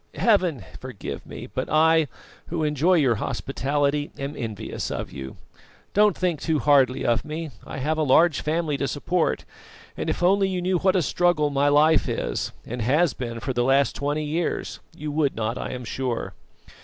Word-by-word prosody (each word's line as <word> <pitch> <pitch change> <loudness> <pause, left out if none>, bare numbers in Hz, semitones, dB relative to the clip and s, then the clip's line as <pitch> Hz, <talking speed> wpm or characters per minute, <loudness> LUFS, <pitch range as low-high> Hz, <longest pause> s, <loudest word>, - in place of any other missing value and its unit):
Heaven 185 - +2
forgive 130 -5 -7
me; - - -8
but - - -4
I, 160 0 +4 0.4
who 165 -1 -2
enjoy 150 +5 +3
your 130 -9 +3
hospitality, 140 +2 -1
am 140 +1 -4
envious 115 -6 -4
of - - -4
you. 65 -1 -8 0.6
Don't 210 -1 +4
think 175 -5 -1
too 160 -2 +1
hardly 140 -4 +3
of 120 -1 +2
me; 155 0 -5 0.2
I - - -6
have 155 +4 -1
a - - +2
large 155 +3 +4
family 155 -1 -1
to 140 - -1
support, 165 +4 -1 0.5
and - - -3
if - - -2
only 195 +2 +4
you 185 -1 -2
knew 180 0 +1
what 190 +1 +2
a 180 - +3
struggle 155 0 +2
my 140 +1 +2
life 150 +2 +4
is, - - -2
and 125 +1 -5
has 145 +8 +3
been 115 -2 -5
for 130 +2 -3
the 120 0 +1
last 135 +2 +3
twenty 145 +2 -1
years, 160 +3 -2 0.2
you 150 0 -4
would 145 -2 +1
not, 115 +1 -2
I - - -4
am 125 -1 -6
sure. 125 -1 -3
150 Hz, 180 wpm, -24 LUFS, 135-165 Hz, 0.6 s, I